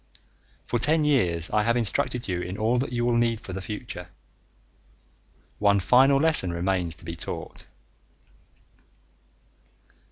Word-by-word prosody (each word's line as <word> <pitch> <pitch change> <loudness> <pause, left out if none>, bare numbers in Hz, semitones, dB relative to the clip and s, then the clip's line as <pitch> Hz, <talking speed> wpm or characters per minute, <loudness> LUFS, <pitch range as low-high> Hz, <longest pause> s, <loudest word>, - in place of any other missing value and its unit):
For 120 - -1
ten 155 +6 +2
years 90 - +1
I 105 - +2
have 115 +3 +1
instructed 120 +1 +1
you 90 -2 -2
in 90 +2 -6
all 115 +3 +1
that 130 - -3
you 120 -1 -1
will 120 -1 +1
need 115 -1 +1
for 95 - -9
the 95 - -5
future. 105 -3 -7 1.5
One 100 -1 +3
final 135 +7 +4
lesson 150 - +2
remains 85 -1 -1
to - - -12
be 85 0 -5
taught. - - -6
110 Hz, 135 wpm, -25 LUFS, 90-125 Hz, 1.5 s, final